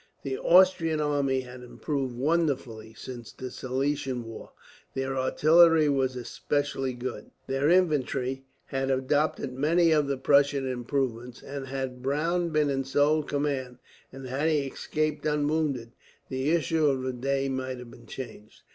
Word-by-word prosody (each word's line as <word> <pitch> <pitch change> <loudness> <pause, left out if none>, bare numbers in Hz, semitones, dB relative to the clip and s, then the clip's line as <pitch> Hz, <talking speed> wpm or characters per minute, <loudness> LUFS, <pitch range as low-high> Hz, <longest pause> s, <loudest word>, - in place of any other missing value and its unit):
The 135 -1 -2
Austrian 170 -2 +4
army 140 -3 +1
had 125 0 -10
improved 130 0 -3
wonderfully, 130 -7 -1
since 120 0 -8
the 130 0 -7
Silesian 130 -1 -2
war. 115 -1 -9 0.4
Their 135 0 -2
artillery 155 +4 +5
were 135 -2 +2
specially 135 +2 -2
good, 120 -3 -6 0.2
their 135 +2 +1
infantry 135 -7 +1 0.2
had 135 -1 -2
adopted 135 +1 0
many 165 +5 +3
of 150 -2 +3
the 140 -1 -1
Prussian 140 0 +3
improvements 125 -1 -3
and, 140 -1 -6
had 130 -1 -4
Browne 165 +6 0
been 150 -2 +2
in 135 0 0
sole 145 +3 +2
command, 140 -4 -2 0.3
and 135 0 -9
had 135 +5 0
he 155 -2 +2
escaped 155 +3 -2
unwounded, 150 -5 0 0.4
the 130 +2 -1
issue 160 -1 +2
of 135 -2 +1
the 130 0 -2
day 135 +2 -1
might 130 -1 -3
have 125 -1 -10
been 120 -2 -15
changed. 110 -5 -9
135 Hz, 145 wpm, -27 LUFS, 130-150 Hz, 0.4 s, artillery